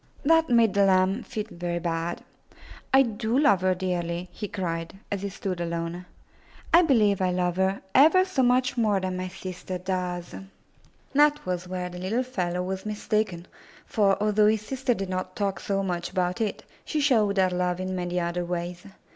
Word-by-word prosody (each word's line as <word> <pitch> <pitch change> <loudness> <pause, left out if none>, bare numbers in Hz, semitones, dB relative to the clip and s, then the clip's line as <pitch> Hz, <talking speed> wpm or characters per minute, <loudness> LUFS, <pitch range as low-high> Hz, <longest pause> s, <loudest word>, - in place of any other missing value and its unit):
That 325 +2 +4
made 230 -4 +4
the 200 - +4
lamb 190 +3 +3
feel 215 -3 -4
very 175 0 -3
bad. 170 0 -3 0.7
"I 270 0 +7
do 225 0 -1
love 275 -11 +4
her 185 0 +2
dearly,*' 175 -1 -3
he 210 - -5
cried, 165 -3 -4 0.2
as 200 -2 -2
he 200 - -3
stood 190 -2 -4
alone. 170 +1 -4 0.7
^'I 340 0 +7
believe 210 - +3
I 185 - +2
love 180 0 0
her 190 +1 0
ever 325 +7 +6
so 370 -8 0
much 255 +1 +2
more 210 -4 +2
than 185 -1 -3
my 185 0 -3
sister 185 0 -6
does." 180 -1 -3 0.8
That 295 +1 +4
was 180 0 -3
where 180 0 -4
the 180 0 -8
little 215 +8 -1
fellow 180 -8 -2
was 190 +1 -4
mistaken, 210 -4 -2 0.4
for, 200 -3 +2
although 210 0 +3
his 215 0 +1
sister 260 -1 -1
did 195 -2 -4
not 185 0 -4
talk 200 -2 -1
so 195 -1 -1
much 175 -2 -2
about 180 +2 -1
it, 215 -2 -2 0.2
she 310 - -2
showed 220 -8 +3
her 185 -1 +3
love 180 0 -1
in 185 0 -3
many 180 0 -2
other 175 +1 -2
ways. 175 +1 -4
190 Hz, 180 wpm, -26 LUFS, 180-220 Hz, 0.8 s, I